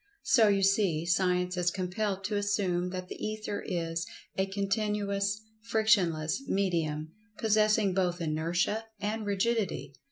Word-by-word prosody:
So, 225 -4 +5
you 200 -1 +3
see, 190 -5 +2
Science 180 0 +1
is 175 0 +2
compelled 190 +2 -2
to 205 +2 -2
assume 195 -3 0
that 185 0 -5
the - - -8
Ether 215 -1 -3
is 165 -1 -2 0.3
"a 190 0 +1
continuous, 200 0 -1 0.2
Frictionless 210 -7 +2
medium, 160 -5 0 0.3
possessing 215 -2 +3
both 180 -2 0
Inertia 170 +7 0
and 210 +1 -2
Rigidity." 200 - 0
195 Hz, 125 wpm, -30 LUFS, 175-210 Hz, 0.3 s, So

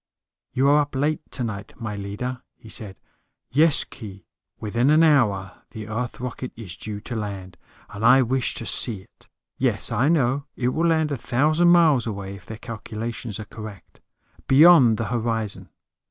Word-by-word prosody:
"You 135 +2 +2
are 145 +1 +5
up 145 -1 -5
late 150 +3 0
tonight, 110 -6 -5
my 110 -3 -4
leader," 105 +6 -5 0.2
he 115 - -15
said. 105 -3 -5 0.6
"Yes, 155 +3 +4
Khee. 100 -5 -11 0.3
Within 115 +5 0
an 155 +2 +5
hour 105 -12 +2
the 110 -2 -8
Earth 115 +2 -4
rocket 125 0 -5
is 100 -6 -7
due 105 +1 -6
to 120 - -6
land, 100 -4 -5 0.3
and 105 - -8
I 130 +3 +6
wish 130 +1 -1
to 115 - -5
see 110 -5 +1
it. - - -25 0.3
Yes, - - +1
I 130 +7 +2
know, 140 -3 +1
it 125 -1 0
will 165 +6 0
land 160 -2 +1
a 140 - -1
thousand 155 +9 +2
miles 160 -8 +5
away, 100 -2 -5
if 100 -1 -13
their 110 - -7
calculations 115 -1 -6
are 110 - -6
correct. 110 -3 -11 0.5
Beyond 135 -5 +7
the 115 - -2
horizon. 115 -3 -2
120 Hz, 170 wpm, -23 LUFS, 105-140 Hz, 0.6 s, Beyond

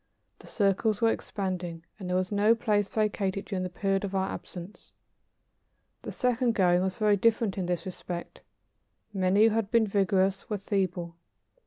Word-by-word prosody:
The - - -15
circles 205 0 +1
were 230 -1 +4
expanding, 180 -6 -4
and 185 -2 -6
there 180 - 0
was 185 +1 -1
no 210 +3 +4
place 210 -4 +1
vacated 200 -2 -1
during 190 -2 -3
the 185 - -2
period 195 +2 -1
of 200 -1 -3
our 190 0 0
absence. 180 +3 -9 1.1
The - - -6
second 250 -2 +1
going 180 -2 +4
was 190 0 -1
very 210 -1 +3
different 225 -1 +2
in 185 -3 -2
this 175 -2 -2
respect. 180 -1 -7 0.7
Many 190 +2 +3
who 225 - +7
had 220 -3 0
been 230 -1 +4
vigorous 195 -1 +1
were 210 - -1
feeble. 185 -4 -2
195 Hz, 165 wpm, -28 LUFS, 185-210 Hz, 1.1 s, who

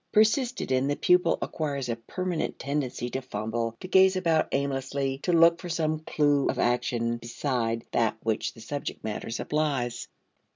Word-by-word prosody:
Persisted 230 - +2
in, 130 +1 +2
the 145 - +1
pupil 180 0 +3
acquires 140 -5 -3
a 115 - -1
permanent 175 +9 -3
tendency 135 -3 -2
to 130 - -2
fumble, 115 -1 -3
to - - -6
gaze 190 0 +5
about 165 -4 +2
aimlessly, 135 0 -1
to 180 - -1
look 170 0 +6
for 180 - -7
some 155 -2 0
clew 145 -2 +2
of - - -1
action 120 -1 0
beside 115 -1 -2
that 110 -2 +1
which 110 -1 -1
the 115 - -12
subject 145 +4 -5
matter 110 0 -4
supplies. 125 -1 -1
140 Hz, 160 wpm, -27 LUFS, 120-165 Hz, -, look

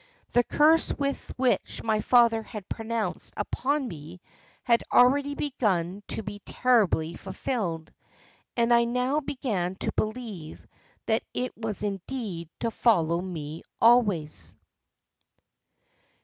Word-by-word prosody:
The 245 - +5
curse 310 +6 +4
which 275 -2 -1
my 220 -1 +1
father 235 -2 +4
had 210 -3 -9
pronounced 225 -1 -3
upon 280 0 -1
me 165 -1 -9 0.4
had 235 -2 +3
already 280 +3 +4
begun 200 - -1
to 220 - -2
be 205 0 -6
terribly 205 -11 +2
fulfilled, 190 -5 -4 0.6
and 235 0 +4
I 235 0 +5
now 250 +4 +1
began 245 -11 -2
to - - -3
believe 215 -8 -4 0.4
that 220 0 +2
it 250 0 -2
was 220 -2 -2
indeed 195 -4 -4
to 230 - 0
follow 170 -8 +2
me 160 -4 -6 0.2
always." 185 - +3
225 Hz, 110 wpm, -27 LUFS, 180-250 Hz, 0.6 s, The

